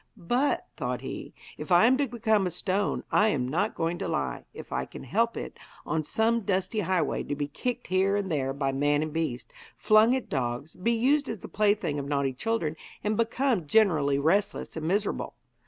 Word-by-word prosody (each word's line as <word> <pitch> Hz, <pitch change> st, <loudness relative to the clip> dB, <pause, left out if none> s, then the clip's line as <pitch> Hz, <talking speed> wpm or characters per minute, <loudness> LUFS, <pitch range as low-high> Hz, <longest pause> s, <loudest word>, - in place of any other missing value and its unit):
'But,' 245 Hz, +10 st, 0 dB
thought -, -, -2 dB
he, -, -, -6 dB, 0.3 s
'if -, -, -7 dB
I 175 Hz, +5 st, +7 dB
am 255 Hz, +3 st, +5 dB
to 285 Hz, 0 st, +1 dB
become 220 Hz, -4 st, +1 dB
a -, -, 0 dB
stone, 185 Hz, +3 st, -1 dB
I 210 Hz, -, +4 dB
am 130 Hz, -11 st, 0 dB
not 155 Hz, +7 st, 0 dB
going 170 Hz, +1 st, -1 dB
to -, -, -2 dB
lie, -, -, -2 dB
if -, -, -11 dB
I -, -, 0 dB
can -, -, -10 dB
help 230 Hz, -, 0 dB
it, -, -, -7 dB, 0.3 s
on 160 Hz, -1 st, -1 dB
some 225 Hz, +8 st, +1 dB
dusty 190 Hz, +1 st, -1 dB
highway, 185 Hz, -4 st, 0 dB
to 145 Hz, -, -3 dB
be 145 Hz, 0 st, -2 dB
kicked 245 Hz, -, -4 dB
here 190 Hz, +2 st, +2 dB
and 200 Hz, -3 st, -2 dB
there 135 Hz, -3 st, 0 dB
by 135 Hz, 0 st, -1 dB
man 145 Hz, +2 st, +1 dB
and 155 Hz, -1 st, -5 dB
beast, 155 Hz, -7 st, -3 dB, 0.2 s
flung 215 Hz, +3 st, +5 dB
at 260 Hz, -, -3 dB
dogs, 125 Hz, +3 st, -3 dB
be 210 Hz, +6 st, 0 dB
used 275 Hz, +5 st, +2 dB
as 225 Hz, -, -3 dB
the -, -, -9 dB
plaything 205 Hz, -8 st, +1 dB
of 140 Hz, -, -5 dB
naughty 140 Hz, -2 st, 0 dB
children, 165 Hz, -, -2 dB, 0.3 s
and 210 Hz, +1 st, 0 dB
become 230 Hz, -, 0 dB
generally 155 Hz, -8 st, +3 dB
restless 190 Hz, +8 st, 0 dB
and 160 Hz, -1 st, -3 dB
miserable. 205 Hz, +4 st, -1 dB
185 Hz, 200 wpm, -28 LUFS, 145-220 Hz, 0.3 s, I